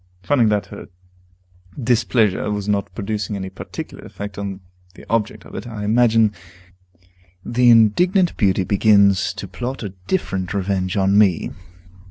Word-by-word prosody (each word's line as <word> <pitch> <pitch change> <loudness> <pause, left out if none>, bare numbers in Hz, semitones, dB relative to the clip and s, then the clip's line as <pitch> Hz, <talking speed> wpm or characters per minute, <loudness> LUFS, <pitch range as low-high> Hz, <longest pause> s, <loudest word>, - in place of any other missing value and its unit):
Finding 125 -6 +3
that 105 -1 0
her - - -10 0.9
displeasure 115 -4 +1
was 105 -1 -3
not 100 -4 -1
producing 105 0 -3
any 95 -1 -5
particular - - -8
effect 100 -1 -8
upon 100 -1 -5 0.3
the - - -14
object 115 -2 -1
of - - -14
it, 110 - -6
I 110 -3 -6
imagine 110 0 +3 1.1
the 120 +1 +3
indignant 175 - +4
beauty 95 -3 +2
begins 100 0 +3
to 100 - -7
plot 120 +9 -5
a 105 - -4 0.2
different 95 - -2
revenge 95 -1 -1
on 100 +1 +3
me. 95 -6 +2
105 Hz, 140 wpm, -20 LUFS, 100-115 Hz, 1.1 s, indignant